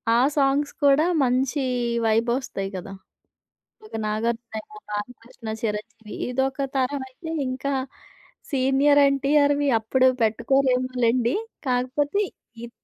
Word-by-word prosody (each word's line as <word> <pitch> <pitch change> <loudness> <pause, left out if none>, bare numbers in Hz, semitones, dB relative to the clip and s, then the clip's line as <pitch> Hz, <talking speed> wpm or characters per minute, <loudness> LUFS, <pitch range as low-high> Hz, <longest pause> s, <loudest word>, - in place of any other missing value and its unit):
ఆ - - +4 0.2
సాంగ్స్ 280 +1 +2
కూడా 285 +3 +5 0.2
మంచి 260 +3 +1 0.5
వైబొస్తాయి 225 -2 0
కదా! 185 +2 -7 0.9
ఒక - - -18
నాగార్జునేమో, 220 0 -3
బాలకృష్ణ, 230 +2 -7
చిరంజీవి 220 0 -5 0.2
ఇదొక 265 +2 -1
తరం 265 +1 0
అయితే 320 +5 -8 0.2
ఇంకా 260 +2 -3 0.8
సీనియర్ 275 +2 +4
ఎన్టీఆర్‌వి 285 +1 +2
అప్పుడు 255 +4 +2 0.2
పెట్టుకోరేమోలెండి. 250 0 +2 0.3
కాకపోతే 260 +8 0 0.5
ఇద్ - - -13
255 Hz, 95 wpm, -24 LUFS, 230-275 Hz, 0.9 s, కూడా